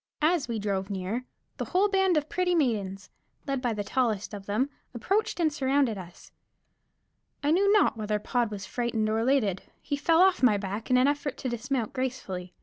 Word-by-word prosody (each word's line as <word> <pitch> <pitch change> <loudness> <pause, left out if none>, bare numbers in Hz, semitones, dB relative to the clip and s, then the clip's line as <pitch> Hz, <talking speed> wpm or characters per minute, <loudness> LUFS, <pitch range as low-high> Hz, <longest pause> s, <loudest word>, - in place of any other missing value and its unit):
As 315 -3 +2
we 230 -2 -2
drove 200 -2 -2
near, 200 +6 -3 0.3
the - - -3
whole 375 +3 +2
band 385 -4 +2
of 300 0 0
pretty 360 +1 0
maidens, 200 - -1 0.3
led 275 -2 -2
by 245 -2 0
the 210 -2 -2
tallest 220 -2 -1
of 200 -1 -8
them, 245 +8 0 0.2
approached 390 - 0
and 315 -3 +2
surrounded 270 -4 +1
us. 180 -3 -11 1.1
I 290 - +2
knew 395 +4 +4
not 420 - +4
whether 210 -1 -1
Pod 235 +2 0
was 200 -2 -6
frightened 235 0 -1
or 220 +1 +1
elated; 225 -6 +1 0.2
he 290 - -3
fell 325 +4 +3
off 380 -1 +3
my 235 -5 +5
back 200 +2 -5
in 255 - +5
an 255 +2 +4
effort 290 0 -1
to 255 - -3
dismount 240 0 -2
gracefully. 240 -9 -4
245 Hz, 190 wpm, -28 LUFS, 210-290 Hz, 1.1 s, my